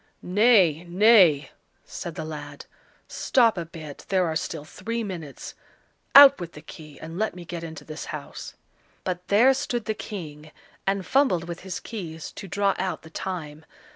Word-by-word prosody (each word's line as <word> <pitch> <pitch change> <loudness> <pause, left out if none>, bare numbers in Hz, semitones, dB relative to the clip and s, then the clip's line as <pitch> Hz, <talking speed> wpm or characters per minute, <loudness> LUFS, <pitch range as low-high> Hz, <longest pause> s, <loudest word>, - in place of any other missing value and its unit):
"Nay, 185 -5 +4
nay!" 175 - +5 0.3
said 170 -2 -7
the - - -5
lad; 145 -2 -8 0.4
"stop 235 -4 +2
a 170 -3 -5
bit, 155 -4 -10
there 190 -2 +2
are 160 -1 -2
still 160 -1 -4
three 230 +8 -4
minutes! 170 -9 -7 0.6
Out 280 0 +10
with 170 -1 -7
the 150 - -11
key, 155 -2 -12
and 165 +3 -7
let 220 -3 -1
me 175 -1 -9
get 170 0 -6
into 160 -2 -8
this 155 +1 -7
house." 150 -2 -8 0.5
But 180 0 -4
there 235 +7 +5
stood 240 -3 -3
the 220 - -1
King 155 -8 -8 0.4
and 195 -1 0
fumbled 255 -12 +2
with 170 -1 -6
his 190 -1 -6
keys, 165 -8 -7
to 195 - -9
draw 200 +2 +1
out 185 -2 -3
the 160 - -13
time. 160 -5 -5
175 Hz, 170 wpm, -25 LUFS, 160-205 Hz, 0.6 s, Out